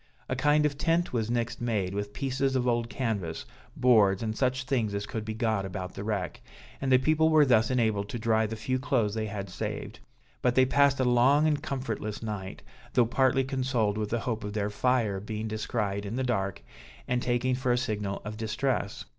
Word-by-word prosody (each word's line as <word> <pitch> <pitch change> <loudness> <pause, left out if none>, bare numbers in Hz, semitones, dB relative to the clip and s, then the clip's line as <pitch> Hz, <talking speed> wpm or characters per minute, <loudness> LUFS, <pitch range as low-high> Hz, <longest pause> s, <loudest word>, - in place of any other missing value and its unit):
A 130 - -1
kind 150 +3 +3
of 145 -1 -1
tent 170 0 +1
was 115 -2 -1
next 120 0 -2
made, 105 -6 -1
with 100 0 -3
pieces 135 +2 -1
of 125 -1 +1
old 120 -1 +1
canvass, 105 -9 -3 0.3
boards, 105 -5 +4
and 110 -1 -2
such 130 +1 0
things 120 -6 0
as 100 0 -2
could 110 +1 -4
be 110 0 -5
got 110 -3 0
about 95 -1 -5
the 100 - -6
wreck, 105 -4 -3 0.4
and 135 -1 0
the 130 - +8
people 155 +4 +3
were 155 -2 +6
thus 115 -4 +4
enabled 110 -5 +1
to - - -4
dry 110 -1 +2
the 110 - -5
few 130 +4 -2
clothes 120 -6 +1
they 110 -1 -2
had 100 -1 -5
saved. 90 - -5 0.4
But 125 -1 +2
they 130 - +6
passed 140 +1 +3
a - - +3
long 125 +5 +4
and 150 -2 +1
comfortless 115 -7 -4
night, 105 -4 -5 0.3
though 120 - +4
partly 130 +3 +2
consoled 130 -6 0
with 105 -1 -2
the 120 +1 -1
hope 110 -3 -3
of 105 0 -5
their 105 -1 -1
fire 115 -3 +1
being 110 +2 -4
descried 105 -2 -2
in 100 +3 -4
the 130 - -1
dark, 100 -7 -1 0.4
and 125 0 0
taken 125 +1 +1
for 125 0 0
a 120 - +3
signal 105 -5 -2
of 105 +1 -5
distress. 115 0 -2
115 Hz, 205 wpm, -28 LUFS, 105-130 Hz, 0.4 s, the